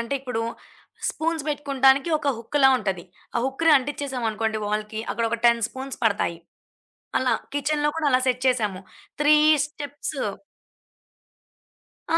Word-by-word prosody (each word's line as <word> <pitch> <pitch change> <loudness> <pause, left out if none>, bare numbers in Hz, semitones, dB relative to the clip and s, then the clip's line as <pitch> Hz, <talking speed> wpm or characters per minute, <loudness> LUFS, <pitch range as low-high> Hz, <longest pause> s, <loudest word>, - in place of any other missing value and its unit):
అంటే 235 +4 -3
ఇప్పుడు 250 -4 -3 0.7
స్పూన్స్ 320 -1 -2
పెట్టుకుంటానికి, 275 0 +2
ఒక 285 - -2
హుక్‌లా 265 +4 +3
ఉంటది. 190 -5 -3 0.3
ఆ - - +2
హుక్‌ని 310 +4 +2
అంటించేసాం 270 -2 -4
అనుకోండి 220 0 -2
వాల్‌కి, 215 +1 -3
అక్కడొక 230 0 -1
10 235 -1 +4
స్పూన్స్ 265 +1 -7
పడతాయి. 200 -5 +1 0.8
అలా 260 -1 +2 0.2
కిచెన్‌లో 295 +1 +1
కూడా 315 -2 0
అలా 255 0 +4
సెట్ 250 0 0
చేసాము. 210 -7 0 0.4
3 300 +1 +6 0.3
స్టెప్స్. 290 -1 -6 2.0
ఆ! 330 - +5
260 Hz, 125 wpm, -24 LUFS, 225-290 Hz, 2.0 s, 3